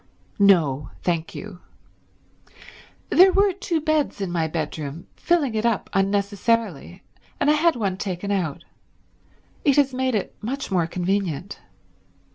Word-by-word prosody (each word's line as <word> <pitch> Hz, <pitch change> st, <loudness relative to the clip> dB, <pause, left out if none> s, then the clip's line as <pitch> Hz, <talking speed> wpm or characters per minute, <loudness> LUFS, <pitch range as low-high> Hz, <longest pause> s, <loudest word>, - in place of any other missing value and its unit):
"No, 155 Hz, -9 st, +3 dB
thank 170 Hz, -2 st, -1 dB
you. 195 Hz, -3 st, -8 dB, 1.5 s
There 375 Hz, +2 st, +7 dB
were 395 Hz, 0 st, +3 dB
two 365 Hz, -3 st, -2 dB
beds 310 Hz, -4 st, 0 dB
in 195 Hz, -3 st, -3 dB
my 165 Hz, -2 st, 0 dB
bedroom, 155 Hz, 0 st, -5 dB
filling 320 Hz, -8 st, +1 dB
it 215 Hz, 0 st, -1 dB
up 235 Hz, -4 st, 0 dB
unnecessarily, 200 Hz, -2 st, 0 dB, 0.4 s
and 295 Hz, -, +3 dB
I -, -, +5 dB
had 320 Hz, +2 st, +3 dB
one 195 Hz, -5 st, -2 dB
taken 195 Hz, 0 st, -4 dB
out. 175 Hz, -8 st, -2 dB, 1.0 s
It 280 Hz, -3 st, +4 dB
has 275 Hz, -2 st, +3 dB
made 260 Hz, -1 st, 0 dB
it 205 Hz, -, -3 dB
much 260 Hz, +2 st, -4 dB
more 175 Hz, -3 st, +2 dB
convenient." 180 Hz, -1 st, -2 dB
200 Hz, 130 wpm, -23 LUFS, 175-270 Hz, 1.5 s, There